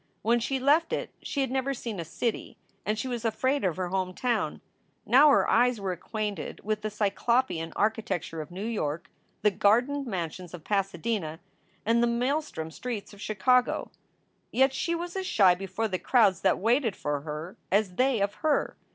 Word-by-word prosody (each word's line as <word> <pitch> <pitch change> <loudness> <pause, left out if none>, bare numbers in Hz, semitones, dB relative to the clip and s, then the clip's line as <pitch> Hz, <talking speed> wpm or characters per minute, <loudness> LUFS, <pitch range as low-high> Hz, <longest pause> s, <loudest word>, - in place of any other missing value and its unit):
When 235 +2 +3
she 265 +3 -1
left 295 +5 +3
it - - -2
she 280 - -2
had 265 - -1
never 270 +1 0
seen 225 -5 -5
a - - -2
city 220 +8 -3 0.3
and 215 +1 +1
she 240 - -3
was 240 -2 -3
afraid 260 +5 0
of 185 -3 0
her 185 -1 -2
home 185 -1 -2
town. 245 -1 -1 0.5
Now 280 +5 +7
her 280 - +4
eyes 245 0 +3
were 195 -2 -2
acquainted 210 +3 -4
with 215 0 -1
the 215 - -2
cyclopean 210 -3 0
architecture 200 -6 -1
of 150 - -8
New 190 +4 -6
York, 170 -7 -3 0.3
the 210 - +5
gardened 250 +8 +2
mansions 180 -3 -4
of 165 - -12
Pasadena, 195 -4 -1 0.5
and 230 +2 +3
the 240 - +4
maelstrom 240 - -1
streets 225 +1 -5
of 205 - -13
Chicago. 245 +5 +2 0.6
Yet 265 +1 +3
she 340 +5 -1
was 345 +2 -5
as 380 -1 -2
shy 195 - +5
before 195 +4 -3
the 185 -3 -2
crowds 200 -3 +3
that 190 - +3
waited 230 +1 +2
for 145 -1 -2
her 155 +4 -6 0.2
as 200 -1 +2
they 255 +1 +2
of 200 0 +1
her. 310 -2 +1
215 Hz, 180 wpm, -28 LUFS, 185-250 Hz, 0.6 s, Now